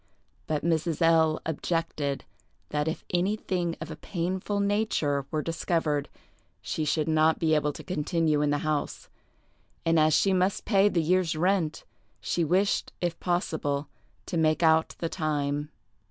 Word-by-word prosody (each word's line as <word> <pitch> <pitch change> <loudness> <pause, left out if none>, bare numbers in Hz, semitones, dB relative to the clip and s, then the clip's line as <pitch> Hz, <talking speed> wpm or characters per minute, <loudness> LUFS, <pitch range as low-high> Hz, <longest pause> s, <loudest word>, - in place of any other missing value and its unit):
But 150 -2 -1
Mrs. 165 -1 0
L—— 160 -1 +4
objected 160 -3 -2 0.4
that 150 0 -1
if 160 - -3
anything 180 -2 0
of 160 +1 -6
a - - -5
painful 185 +5 -3
nature 200 -9 0
were 155 -1 -2
discovered 165 -3 -1 0.5
she 155 - -3
should 150 +1 0
not 160 0 +3
be 160 -1 +1
able 150 -1 +2
to - - -10
continue 160 -2 0
in 150 - +2
the 145 - +2
house, 155 -2 -2 0.8
and 165 0 +4
as 155 -1 +4
she 195 - +3
must 185 +1 +1
pay 200 -1 +4
the 170 -5 +1
year's 180 0 +2
rent, 170 -1 0 0.4
she 170 - -1
wished, 185 +6 +1
if 175 -2 -2
possible, 155 -5 -1 0.4
to 170 - -3
make 155 +1 +2
out 160 0 +3
the 165 - -2
time. 145 -3 -2
160 Hz, 150 wpm, -27 LUFS, 150-175 Hz, 0.8 s, L